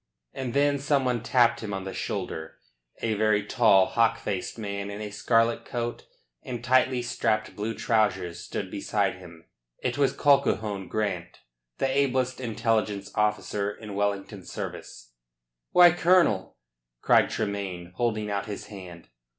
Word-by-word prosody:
And 130 -2 -4
then 140 0 +3
some 140 -1 +1
one 125 -2 0
tapped 120 0 +3
him 105 -3 -4
on 95 - -4
the 95 0 -6
shoulder. 90 -5 -4 0.5
A 115 - +1
very 105 -1 +2
tall, 105 -5 +5
hawk 115 +1 +2
faced 100 0 -4
man 100 -2 -4
in 100 +1 -6
a 105 -1 -5
scarlet 115 +2 +2
coat 120 -1 -4 0.3
and 120 -2 -6
tightly 130 0 +3
strapped 110 -2 -1
blue 110 +2 -3
trousers 95 -7 0
stood 95 - -5
beside 100 -1 -1
him. 85 -3 -14 0.3
It 125 +3 -3
was 140 - +3
Colquhoun 110 -9 +2
Grant, 90 -5 -3 0.4
the - - 0
ablest 130 -1 0
intelligence 110 -4 -1
officer 105 -1 0
in 105 0 -8
Wellington's 100 -1 -3
service. - - -7 0.6
"Why, 175 -1 +8
Colonel!" 170 - +3 0.5
cried - - +5
Tremayne, 95 -3 -3
holding 110 -2 -1
out 100 +2 -2
his 105 - -6
hand. 90 - -10
105 Hz, 140 wpm, -27 LUFS, 100-120 Hz, 0.6 s, Why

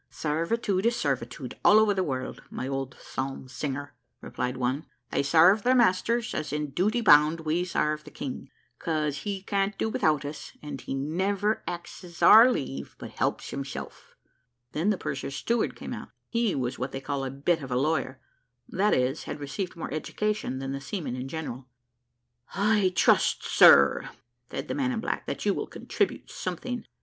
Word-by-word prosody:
"Sarvitude 185 +6 0
is 235 - +2
sarvitude - - -3
all 210 - +7
over 215 -1 +5
the 190 -1 0
world, 130 -5 -4
my 130 - -5
old 135 -1 -3
psalm 135 0 -5
singer," 145 +1 -4 0.3
replied 125 +1 -4
one. 130 +5 -1 0.2
"They - - +1
sarve 170 +8 +5
their 255 +4 +3
masters, 235 +1 +2
as 155 -2 -3
in 150 -1 -2
duty 210 - +1
bound; 155 -4 +6
we 160 +3 0
sarve 155 -3 -1
the - - -11
King, 130 - -6 0.3
'cause 150 -3 -1
he 195 +1 -4
can't 200 0 -1
do 220 - 0
without 155 -8 +1
us 145 +1 -7
and 145 -3 -7
he - - -4
never 190 +9 0
axes 175 0 -7
our 230 +4 +9
leave, 70 - -4
but - - -8
helps - - -2
himself." 140 -1 -7 0.6
Then 165 +7 0
the 210 - +2
purser's 140 -2 -4
steward 235 +7 0
came - - -6
out; - - -7 0.2
he 230 -4 +1
was 130 -1 -2
what 130 +2 -3
they 135 - -3
call 140 0 -3
a 135 - -2
bit 145 +5 0
of 135 - -7
a 125 - 0
lawyer, 135 -2 0 0.5
that 205 +3 +2
is, 130 +3 0
had 150 - -5
received 145 +7 -4
more 165 - -5
education 210 -1 -2
than 135 0 -4
the 135 0 -4
seamen 150 -3 -4
in 130 +1 -5
general. 135 -4 -6 0.9
"I 205 -1 +3
trust, - - +3
sir," 70 0 +6 0.4
said 135 - -5
the - - -2
man 270 -2 0
in 235 - -2
black, - - -3
"that - - -4
you - - +3
will - - -3
contribute - - -2
something." 250 - -4
155 Hz, 180 wpm, -27 LUFS, 135-200 Hz, 0.9 s, our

